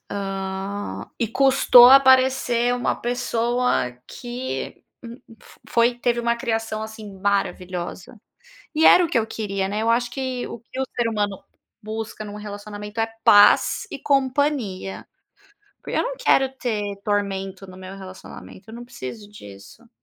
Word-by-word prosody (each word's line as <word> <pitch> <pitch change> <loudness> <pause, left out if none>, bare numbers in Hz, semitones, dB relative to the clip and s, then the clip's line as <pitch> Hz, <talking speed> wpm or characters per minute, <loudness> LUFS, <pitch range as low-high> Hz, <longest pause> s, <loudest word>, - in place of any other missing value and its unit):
ah, 195 - -5
e 230 - 0
custou 260 -1 +6
aparecer 260 -2 +4
uma 245 - -1
pessoa 240 - -1
que 245 +1 -6 0.6
f - - -18
foi 235 +1 +3
teve 240 -1 0
uma 235 0 0
criação 225 -3 -3
assim 215 -3 -9
maravilhosa. 185 0 -3 0.6
E 320 +1 +2
era 360 - +7
o - - -2
que 240 - +1
eu 220 - -1
queria, 195 -3 -3
né, 210 +2 -2
eu 225 - 0
acho 240 +1 +1
que 255 -1 -4
o - - -7
que 240 +3 -11
o - - +1
ser 235 -1 +1
humano 205 -3 -2 0.4
busca 215 0 -6
em - - -8
um 205 - -8
relacionamento 210 +1 -7
é 225 - 0 0.2
paz 205 0 +5
e - - -6
companhia. 265 -8 -1 0.8
Porque - - -4
eu - - +2
não - - -4
quero 270 -1 +3
ter 210 -5 -3
tormento 195 -2 -2
no 185 0 -12
meu 190 +1 -9
relacionamento, 190 +1 -12
eu 225 - -10
não 240 - -8
preciso 205 - -9
disso. 105 - -14
220 Hz, 150 wpm, -22 LUFS, 200-245 Hz, 0.8 s, era